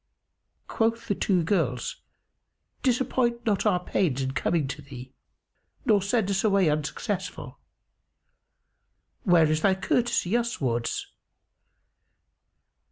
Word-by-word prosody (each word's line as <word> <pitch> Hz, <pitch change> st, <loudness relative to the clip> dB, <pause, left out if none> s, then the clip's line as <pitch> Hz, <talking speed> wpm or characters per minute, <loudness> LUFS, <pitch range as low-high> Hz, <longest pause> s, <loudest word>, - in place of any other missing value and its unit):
Quoth 230 Hz, +1 st, 0 dB
the 205 Hz, -, +1 dB
two 185 Hz, -3 st, +1 dB
girls, 155 Hz, -, -1 dB, 0.8 s
"Disappoint 245 Hz, -2 st, 0 dB
not 215 Hz, -1 st, +1 dB
our 180 Hz, -4 st, +3 dB
pains 155 Hz, -8 st, 0 dB
in 130 Hz, -, -2 dB
coming 145 Hz, +3 st, 0 dB
to 145 Hz, +2 st, -6 dB
thee 130 Hz, -2 st, -11 dB, 0.7 s
nor 215 Hz, -5 st, +4 dB
send 200 Hz, 0 st, 0 dB
us 195 Hz, -, 0 dB
away 195 Hz, -6 st, +3 dB
unsuccessful. 155 Hz, +6 st, -4 dB, 1.7 s
Where 175 Hz, -4 st, +5 dB
is 155 Hz, 0 st, +1 dB
thy 190 Hz, +1 st, +3 dB
courtesy 230 Hz, 0 st, 0 dB
uswards? 135 Hz, -, -1 dB
190 Hz, 100 wpm, -26 LUFS, 150-225 Hz, 1.7 s, Where